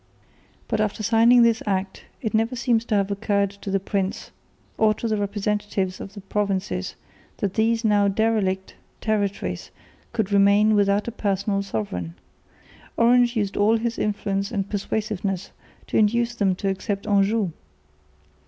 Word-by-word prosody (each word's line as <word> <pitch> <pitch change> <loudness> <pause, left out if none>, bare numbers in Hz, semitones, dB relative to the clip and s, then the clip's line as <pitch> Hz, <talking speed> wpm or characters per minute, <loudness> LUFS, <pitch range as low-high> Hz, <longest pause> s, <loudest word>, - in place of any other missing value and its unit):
But 220 -2 0
after 215 0 -2
signing 235 +3 +5
this 230 -1 +3
Act 195 -1 -2 0.2
it 220 - -2
never 225 +3 +1
seems 235 -2 +1
to 215 - 0
have 200 0 +1
occurred 200 -1 0
to 200 0 -9
the 195 0 +1
prince 195 0 -3 0.5
or 215 -1 +4
to 230 - -3
the 220 - +1
representatives 205 -2 -2
of 200 - -9
the 200 - -8
provinces, 195 -2 -2 0.4
that 195 -2 -2
these 225 +1 +1
now 205 -1 +4
derelict 200 -2 0 0.3
territories 200 - -2 0.4
could 220 -4 -1
remain 200 +2 +5
without 205 0 +2
a - - -2
personal 200 -2 -1
sovereign. 95 - -4 0.8
Orange 240 +1 +4
used 205 -3 -1
all 215 +3 +3
his 230 +1 -3
influence 200 -1 -1
and 200 -4 -2
persuasiveness 205 -2 -2 0.3
to - - -1
induce 235 +3 +2
them 200 -5 +1
to 195 - -3
accept 195 +1 -2
Anjou. 200 -1 +2
205 Hz, 145 wpm, -24 LUFS, 195-220 Hz, 0.8 s, signing